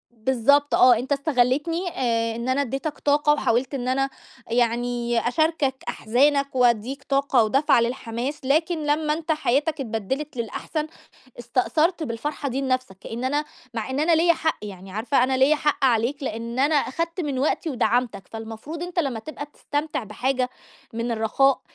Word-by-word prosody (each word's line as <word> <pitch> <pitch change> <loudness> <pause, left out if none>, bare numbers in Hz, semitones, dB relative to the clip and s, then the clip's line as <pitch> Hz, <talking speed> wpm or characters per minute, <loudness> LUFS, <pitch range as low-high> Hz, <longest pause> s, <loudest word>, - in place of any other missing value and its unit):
بالضبط 265 +5 +2
آه، 250 -2 +7
أنت 265 +4 -3
استَغلِّيتني 290 +5 +1
آآ 230 -8 -1
إن 235 +2 -4
أنا 260 +2 +2
أدِّيتك 275 +3 -3
طاقة، 295 +1 +3
وحاولت 260 -2 0
إن 250 -1 -3
أنا 270 +1 +1 0.4
يعني 240 0 0
أشاركك 305 -1 +1
أحزانك 275 +4 +1
وأدِّيك 245 +2 +2
طاقة 275 -4 +2
ودفعة 265 +2 +3
للحماس، 240 +3 -3
لكن 315 +3 +1
لمّا 300 +1 +1
أنت 320 +1 -1
حياتك 300 +1 0
اتبدلت 260 +5 -3
للأحسن، 275 +7 -3 0.5
استأثرت 265 +8 +1
بالفرحة 280 +3 -3
دي 265 +2 -2
لنفسك، 255 -7 -1
كأن 235 +5 -6
أنا 290 +3 0 0.3
مع 225 +2 -3
إن 265 +2 -1
أنا 330 +3 +3
ليّا 335 +2 +5
حق، 320 -1 -1
يعني 195 -2 -8
عارفة 245 +5 +1
أنا 260 0 +1
ليّا 275 +4 +4
حق 295 -2 0
عليك، 245 +3 +2
لإن 235 0 -4
أنا 290 +3 +3
أخدت 335 +5 -1
من 285 -5 -2
وقتي 310 +3 0
ودعمتك، 240 -5 0
فالمفروض 225 +9 -7
أنت 355 0 -5
لمّا 275 -8 0
تبقى 290 +3 -7
تستمتع 290 -4 -3
بحاجة 255 +4 -1 0.4
من 230 +1 -3
الرَّخاء، 230 +5 +2
265 Hz, 155 wpm, -24 LUFS, 235-295 Hz, 0.5 s, آه